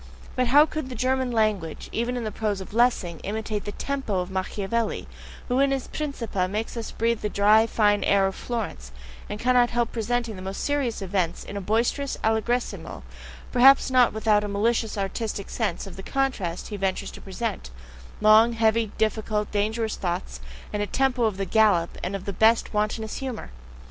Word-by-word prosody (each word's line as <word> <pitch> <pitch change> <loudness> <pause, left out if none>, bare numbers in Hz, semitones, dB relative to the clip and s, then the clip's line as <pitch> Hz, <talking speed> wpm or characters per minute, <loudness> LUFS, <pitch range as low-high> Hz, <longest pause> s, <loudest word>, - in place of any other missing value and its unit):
But 255 -1 +1
how 290 +5 +7
could 310 -3 -5
the 255 - -6
German 260 0 0
language, 215 -8 0
even 240 +2 -1
in 240 - -3
the 215 - -3
prose 210 -3 -2
of 190 - -9
Lessing, 220 -8 +2
imitate 215 0 -4
the 205 - -3
TEMPO 265 -6 -2
of 180 +1 -6
Machiavelli, 200 +4 -2 0.4
who 250 +1 +1
in 275 0 +4
his 270 -2 -2
"Principe" 235 -11 -2
makes 215 +5 -3
us 230 -2 -4
breathe 230 0 0
the 210 - -1
dry, 210 +2 +4
fine 205 -2 +2
air 200 -1 +3
of 195 - -1
Florence, 205 - -5 0.4
and 210 - -5
cannot 245 0 +4
help 240 -1 0
presenting 235 0 -2
the 185 - -8
most 190 +1 -5
serious 270 -8 -1
events 185 -3 -1
in - - -8
a 200 - -3
boisterous 235 +7 0
allegrissimo, 225 +3 -1 0.5
perhaps 265 +2 +6
not 250 -2 +5
without 215 -1 +2
a - - -2
malicious 220 +2 0
artistic 200 +1 -3
sense 210 -7 -2
of 195 -2 -10
the - - -6
contrast 210 -9 -2
he 210 - -5
ventures 190 -1 -2
to - - -11
present 195 - -4 0.5
long, 215 +2 +6
heavy, 225 -1 +2
difficult, 215 -1 -1
dangerous 220 +2 -1
thoughts, 180 0 -3 0.3
and 210 - -1
a 205 - -1
TEMPO 255 -1 +1
of 210 -4 0
the 195 - -2
gallop, 205 -6 +3
and 185 +3 -3
of 195 - -6
the 200 - -3
best, 225 +4 +3
wantonest 215 +1 -1
humour? 260 - -5
220 Hz, 185 wpm, -25 LUFS, 200-240 Hz, 0.5 s, how